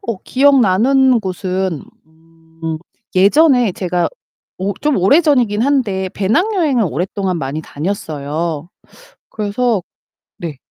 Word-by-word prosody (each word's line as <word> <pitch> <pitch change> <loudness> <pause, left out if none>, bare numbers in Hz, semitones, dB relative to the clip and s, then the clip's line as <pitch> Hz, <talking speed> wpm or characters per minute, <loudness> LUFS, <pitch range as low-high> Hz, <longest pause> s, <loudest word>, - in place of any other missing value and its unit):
어 230 -4 -3
기억나는 260 -1 +4
곳은 185 -3 -3 0.8
음. 160 -1 -2 0.4
예전에 245 - +4
제가 180 -1 -1 0.5
오 195 +2 -1
좀 300 -2 +1
오래 200 - +5
전이긴 245 -9 +2
한데 230 -9 0
배낭여행을 300 - +1
오랫동안 185 +4 -2
많이 140 +2 -3
다녔어요. 155 -1 -4 0.6
그래서 215 0 -1 0.6
네. 160 -5 -6
200 Hz, 230 characters per minute, -17 LUFS, 180-255 Hz, 0.8 s, 오래